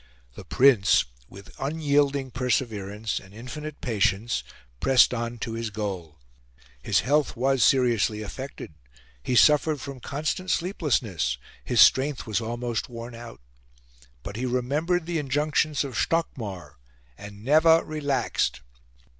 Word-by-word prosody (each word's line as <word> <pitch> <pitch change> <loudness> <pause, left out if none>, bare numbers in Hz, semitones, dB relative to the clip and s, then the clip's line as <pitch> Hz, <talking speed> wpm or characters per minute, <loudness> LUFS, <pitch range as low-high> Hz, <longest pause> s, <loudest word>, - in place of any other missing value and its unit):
The - - -10
Prince, 125 -7 +4 0.2
with 100 +1 -13
unyielding 140 -2 0
perseverance 110 -4 -2
and 100 +1 -16
infinite 150 +6 -8
patience, 105 - 0 0.4
pressed 130 -1 +5
on 120 0 -3
to 115 0 -5
his 115 0 -3
goal. 95 -7 -5 0.6
His - - +2
health 145 +3 +1
was 135 +1 +1
seriously 115 -5 +2
affected; 130 - -8 0.5
he 125 - -2
suffered 150 +3 +4
from 135 0 -8
constant 155 +8 -3
sleeplessness; 125 - 0 0.3
his 120 -4 +3
strength 135 +6 +4
was 110 0 -1
almost 120 +1 -3
worn 120 0 -8
out. 115 - -10 0.8
But 100 +7 -7
he 130 +2 -2
remembered 150 +8 0
the 170 -1 -2
injunctions 150 +1 0
of 135 -2 -6
Stockmar 100 - -2 0.4
and 100 +3 -11
never 160 +3 +5
relaxed. 140 - -1
125 Hz, 120 wpm, -25 LUFS, 110-145 Hz, 0.8 s, pressed